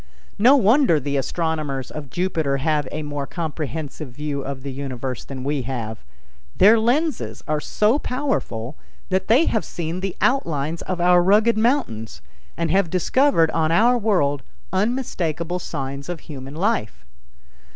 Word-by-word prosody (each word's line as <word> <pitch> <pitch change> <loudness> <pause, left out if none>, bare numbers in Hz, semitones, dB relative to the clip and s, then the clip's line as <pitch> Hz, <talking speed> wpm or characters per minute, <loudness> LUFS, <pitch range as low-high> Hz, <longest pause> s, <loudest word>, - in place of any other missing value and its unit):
No 250 +7 +7
wonder 240 - +4
the 140 +1 -3
astronomers 145 -2 -2
of 150 -3 -7
Jupiter 160 -4 0
have 150 0 0
a 155 - -4
more 145 -1 -4
comprehensive 155 -3 -5
view 145 +2 -4
of 135 -1 -6
the 140 - -4
universe 130 -2 -5
than 130 -2 -7
we 140 0 -1
have. 115 -3 -5 0.5
Their 220 +4 +7
lenses 235 - 0
are 155 0 0
so 215 - +1
powerful 245 - -2 0.3
that 190 0 0
they 255 +9 +5
have 220 - +1
seen 170 +1 -4
the 190 -1 -3
outlines 165 - 0
of 185 -1 -3
our 175 0 +5
rugged 210 +6 +4
mountains, 215 - 0 0.4
and 170 - 0
have 190 -2 +2
discovered 185 - +3
on 160 -1 +1
our 230 +8 +5
world 180 - +1 0.3
unmistakable 180 - -1
signs 140 -2 -5
of 175 -2 -4
human 135 -1 -9
life. 155 - -1
160 Hz, 145 wpm, -22 LUFS, 140-205 Hz, 0.5 s, No